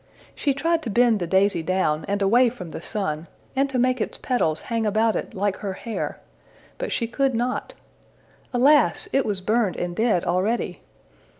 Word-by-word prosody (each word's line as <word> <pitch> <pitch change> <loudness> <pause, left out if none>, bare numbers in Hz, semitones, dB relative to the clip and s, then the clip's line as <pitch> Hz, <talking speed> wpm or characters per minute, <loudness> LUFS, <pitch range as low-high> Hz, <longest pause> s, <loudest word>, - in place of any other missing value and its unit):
She 280 -3 0
tried 330 +3 +1
to 245 - -5
bend 235 0 +3
the 175 - -2
daisy 190 -1 +2
down 160 -3 0
and 200 0 0
away 240 +5 +5
from 180 -9 -9
the - - -7
sun, 170 -5 -2 0.3
and 275 +1 +2
to 265 - -2
make 250 -1 +2
its - - -3
petals 165 -12 0
hang 230 -1 -2
about 220 +1 +2
it - - -4
like 200 0 0
her 195 -2 -4
hair, 225 +3 -5 0.6
but - - -3
she 235 - 0
could 265 +2 0
not. 250 - -2 0.8
Alas! 280 - +4
it 270 - +2
was 200 -3 -1
burned 215 0 +1
and 175 0 -3
dead 220 -5 +1
already! 200 +7 -1
225 Hz, 180 wpm, -24 LUFS, 190-250 Hz, 0.8 s, away